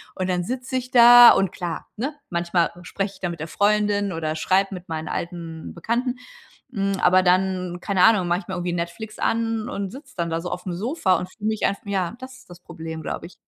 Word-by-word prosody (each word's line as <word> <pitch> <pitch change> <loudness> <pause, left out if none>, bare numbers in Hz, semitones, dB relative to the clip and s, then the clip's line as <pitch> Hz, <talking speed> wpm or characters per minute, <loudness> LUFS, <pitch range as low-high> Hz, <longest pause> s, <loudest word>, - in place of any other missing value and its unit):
Und 185 0 -2
dann 180 -1 0
sitze 255 +5 -4
ich 255 0 -3
da 240 0 +10
und 195 - +1
klar, 175 -3 -5
ne, 265 +8 -3 0.2
manchmal 170 0 0
spreche 195 +2 -4
ich - - -18
da 175 - -1
mit 170 -1 -7
der 160 - -5
Freundin 205 +1 +1
oder 160 -2 -3
schreibe 190 +5 +1
mit 180 -2 -9
meinen 160 -1 -4
alten 165 -2 -6
Bekannten. 240 +8 -2 0.6
Hm, 195 -3 0
aber 185 +1 +5
dann, 180 -1 +1
keine 190 -1 +1
Ahnung, 210 -6 +5
mache 175 +1 +1
ich - - -13
mir 190 - -4
irgendwie 175 -1 -2
Netflix 175 +5 -5
an 225 -1 -1
und 200 -2 -4
sitze 275 +6 -12
dann 170 -1 -1
da 165 0 -1
so 180 - -5
auf'm 180 0 -4
Sofa 200 - +1
und 180 +2 -6
fühle 210 +1 -5
mich 220 -1 -1
einf 200 - -2
ja, 195 -1 -2
das 260 0 -9
ist 255 - -21
das 175 0 -12
Problem, 160 -2 -8
glaube 165 - -5
ich. 180 - -18
185 Hz, 220 wpm, -23 LUFS, 175-215 Hz, 0.6 s, da